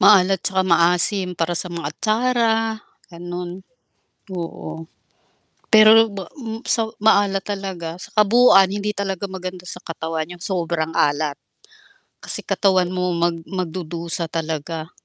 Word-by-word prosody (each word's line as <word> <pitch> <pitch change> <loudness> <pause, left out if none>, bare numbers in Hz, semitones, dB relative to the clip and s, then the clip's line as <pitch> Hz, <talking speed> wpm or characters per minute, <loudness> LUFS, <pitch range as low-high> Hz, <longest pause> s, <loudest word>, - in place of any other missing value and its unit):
Maalat 195 -1 +6
'tsaka 190 0 +1
maasim 180 +2 +2
para 170 +1 -1
sa - - -4
mga 170 -4 -5
atsara 230 +5 +1 0.6
gano'n. 175 +1 -6 0.8
Oo. 165 -2 -6 0.8
Pero 220 +1 +7
ba 200 -3 -8
m 225 -1 -6
sa 225 -1 +1 0.2
maalat 200 -3 +3
talaga, 190 -5 -5
sa - - -8
kabuuan 210 -2 +6
hindi 205 +1 -2
talaga 200 -1 -3
maganda 185 -1 -7
sa 180 - -8
katawan 160 0 -4
'yong 175 -1 -10
sobrang 165 -3 -2
alat. 145 0 +1 0.8
Kasi - - -5
katawan 185 -3 +2
mo 180 -1 -1
mag 170 0 +1
mag-dudusa 170 -2 -4
talaga. 160 0 -4
180 Hz, 125 wpm, -21 LUFS, 170-200 Hz, 0.8 s, Pero